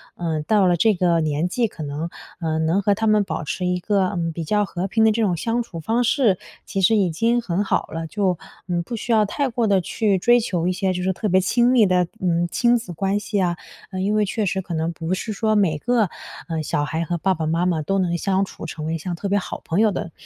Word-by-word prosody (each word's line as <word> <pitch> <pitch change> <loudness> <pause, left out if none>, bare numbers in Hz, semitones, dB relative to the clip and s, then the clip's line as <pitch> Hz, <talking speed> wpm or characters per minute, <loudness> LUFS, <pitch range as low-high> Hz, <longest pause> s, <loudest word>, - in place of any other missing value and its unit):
呃， 160 -3 -2
到 205 +3 +3
了 175 -1 +3
这 215 +5 +3
个 175 -2 +2
年 155 +2 0
纪， 235 +5 0
可 165 - -8
能， 150 +3 -4 0.3
呃， 160 -2 -1
能 160 +5 +1
和 200 0 +2
他 220 - -1
们 215 -1 +4
保 185 - -4
持 180 +5 -3
一 180 0 0
个， 195 0 +1
嗯， 170 -3 -2
比 165 +1 -5
较 210 +6 +1
和 185 0 -3
平 220 +3 +2
的 220 - +5
这 225 +2 0
种 195 -5 +2
相 230 +7 0
处 205 -8 -7
方 225 +10 0
式， 235 -6 +3 0.3
其 195 - -2
实 205 +4 +4
已 195 -5 +2
经 230 +9 +1
很 195 -3 -1
好 - - 0
了。 165 0 -5
就， 190 0 0 0.3
嗯， 175 -1 0
不 235 - -5
需 235 +2 -4
要 215 -2 +4
太 275 +7 -1
过 235 -1 0
地 195 -2 +3
去 200 +3 0
追 240 +6 +4
求 180 -7 -1
一 - - +2
些 190 0 0
就 180 0 -3
是 190 - +1
特 215 - -3
别 185 +1 +4
亲 240 +5 +3
密 240 -4 +5
的 180 -2 +2
嗯， 175 -1 +1
亲 240 0 +3
子 225 -7 -7
关 195 +4 0
系 205 0 -3
呀。 175 -3 +1 0.3
嗯， 185 -1 -3
因 205 +2 +1
为 215 -1 +2
确 210 +2 -1
实 190 0 -1
可 180 -2 -7
能 160 +1 -1
不 165 +2 -3
是 215 +4 -3
说 215 +1 +1
每 185 -7 +2
个， 225 +3 +1 0.4
呃， 165 -2 -2
小 145 - -1
孩 160 +2 -2
和 175 +1 -2
爸 190 +3 +1
爸 160 -3 -3
妈 165 +3 +1
妈 170 -3 +1
都 195 +6 -1
能 175 -2 0
相 195 +2 +1
处 - - -9
成 155 - -6
为 160 +1 -1
像 175 +2 -4
特 200 - -4
别 200 - +2
好 - - -6
朋 165 - 0
友 220 -1 +4
的， 175 -3 -4
185 Hz, 285 characters per minute, -22 LUFS, 170-215 Hz, 0.4 s, 的